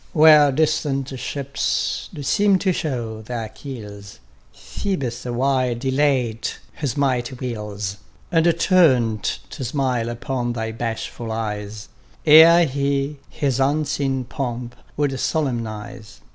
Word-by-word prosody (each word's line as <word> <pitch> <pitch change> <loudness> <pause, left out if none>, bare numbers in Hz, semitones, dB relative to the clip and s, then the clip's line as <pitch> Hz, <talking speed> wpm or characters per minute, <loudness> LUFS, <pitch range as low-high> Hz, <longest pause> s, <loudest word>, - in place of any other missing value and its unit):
Where 150 -2 +7
distant 145 -2 0
ships 140 0 -2
do 145 - -7
seem 195 +8 +3
to 185 0 +1
show 120 -9 -3
their 115 0 -5
keels, 105 -5 -9 0.4
Ph┼ōbus 125 - -4
awhile 130 0 +1
delayed 130 -3 0 0.2
his 145 -2 -3
mighty 130 -2 0
wheels, 105 -5 -5 0.3
And 170 0 +4
turned 130 - +4 0.3
to 135 - -6
smile 125 -3 -1
upon 120 +1 -3
thy 110 -1 -3
bashful 115 0 -4
eyes, 105 -2 -4 0.4
Ere 165 +3 +8
he 140 +1 -1
his 135 -3 -1
unseen 140 -1 0
pomp 120 -1 -5 0.2
would 145 -1 +1
solemnize. 115 - -3
130 Hz, 110 wpm, -22 LUFS, 115-145 Hz, 0.4 s, Ere